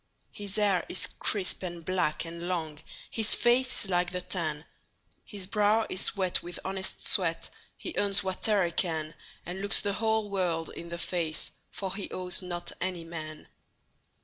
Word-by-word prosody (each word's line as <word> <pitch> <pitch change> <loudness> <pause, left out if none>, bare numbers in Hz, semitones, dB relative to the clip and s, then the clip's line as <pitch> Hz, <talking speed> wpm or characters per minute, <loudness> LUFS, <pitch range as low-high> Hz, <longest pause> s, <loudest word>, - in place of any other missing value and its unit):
His 205 -1 -3
hair 205 -4 +3
is - - 0
crisp, 200 -4 +2
and 175 -3 -5
black, 180 -4 +1
and 170 +1 -6
long, 160 -4 -2 0.3
His 220 -2 +6
face 250 +2 +3
is 195 - -2
like 175 0 +3
the 180 0 -2
tan; 165 -4 -2 0.6
His 200 -3 -7
brow 210 +2 +3
is 190 - 0
wet 185 -2 +2
with 175 0 -6
honest 190 0 -2
sweat, - - +3 0.3
He 350 - -4
earns 200 -1 +3
whate'er 190 +1 +3
he 170 - -1
can, 160 -3 0 0.3
And 180 +2 -4
looks 200 +1 +2
the 200 -1 0
whole 220 0 +1
world 170 -4 0
in 170 - -7
the 170 - -4
face, 170 -3 -1 0.2
For 190 -2 -3
he 200 0 -4
owes 180 0 0
not 175 -1 -4
any 180 -2 -1
man. 155 -2 -7
185 Hz, 170 wpm, -30 LUFS, 170-200 Hz, 0.6 s, His